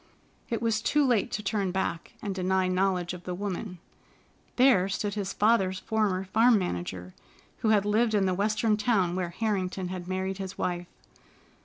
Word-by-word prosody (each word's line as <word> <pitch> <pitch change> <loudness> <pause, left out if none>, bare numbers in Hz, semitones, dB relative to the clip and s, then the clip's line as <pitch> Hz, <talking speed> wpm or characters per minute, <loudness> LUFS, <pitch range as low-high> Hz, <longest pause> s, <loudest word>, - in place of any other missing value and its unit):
It 230 -1 -2
was 225 -1 +1
too 295 +5 +2
late 240 -6 +2
to 210 - -2
turn 200 -1 0
back 175 -3 -3
and 200 - -2
deny 185 0 +1
knowledge 185 -1 0
of 180 -1 -9
the 180 0 -4
woman. 195 0 -4 0.8
There 245 -8 +4
stood 205 +1 -2
his 200 -2 -3
father's 200 -4 +2
former 205 -3 0
farm 225 +5 +4
manager, 90 - -4 0.5
who 220 - +1
had 205 -2 +3
lived 220 +2 +2
in 200 -2 +3
the 185 - +1
Western 210 +3 +1
town 205 -5 +1
where 180 -2 -2
Harrington 190 -2 -2
had 180 -1 -6
married 190 +1 -2
his 190 0 -6
wife. 175 -1 -2
195 Hz, 170 wpm, -28 LUFS, 185-215 Hz, 0.8 s, There